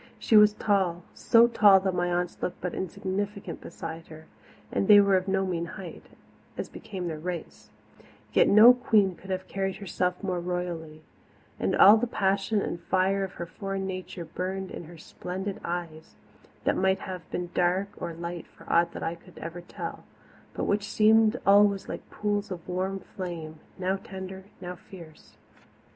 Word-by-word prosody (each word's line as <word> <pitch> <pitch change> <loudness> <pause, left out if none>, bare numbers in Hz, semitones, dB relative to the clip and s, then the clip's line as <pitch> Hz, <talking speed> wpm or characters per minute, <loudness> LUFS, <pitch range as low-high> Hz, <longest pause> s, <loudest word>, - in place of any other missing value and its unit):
She 225 - +1
was 210 0 +8
tall 190 -5 0
so 230 0 +5
tall 205 -4 +6
that 190 -1 0
my 175 0 0
aunts 175 0 -2
looked 180 - -3
but 180 - -4
insignificant 190 +1 -4
beside 165 0 -8
her, 160 0 -12 0.5
and 195 - 0
they 205 -1 +9
were 200 -1 +4
of 185 +1 0
no 190 0 +1
mean 170 -2 -2
height, 180 -4 -9 0.5
as - - -4
became 185 -4 -6
their 160 -2 -4
race; 175 +1 -6 0.6
yet - - +5
no 220 +4 +9
queen 215 -6 +2
could 190 +3 -14
have 185 0 -3
carried 195 -1 -2
herself 180 -1 -2
more 185 -2 -1
royally, 170 -3 -4 0.6
and - - 0
all 205 +3 +9
the 245 +2 0
passion 195 0 0
and 170 - -4
fire 190 +3 +1
of 190 - -5
her 170 - -5
foreign 195 +3 -4
nature 185 -2 -6
burned 185 +3 -4
in - - -7
her 170 +1 -12
splendid 190 +4 -6
eyes, 170 -2 -5 0.5
that - - +2
might 190 0 +1
have 180 -3 -7
been 175 -1 -4
dark 180 +3 +1
or - - -4
light 170 +1 -6
for - - -18
aught 170 0 +3
that - - -6
I 165 - -1
could 170 +1 -16
ever 170 +2 -7
tell, 175 - -7 0.5
but - - -2
which 205 0 0
seemed 220 +2 +4
always 200 0 +5
like - - -7
pools 205 -1 -2
of 180 -3 -7
warm 190 +2 -2
flame, 165 -5 -6 0.2
now 190 +1 0
tender, 190 -1 -8 0.2
now 180 0 -5
fierce. 170 -3 -14
185 Hz, 175 wpm, -27 LUFS, 175-195 Hz, 0.6 s, they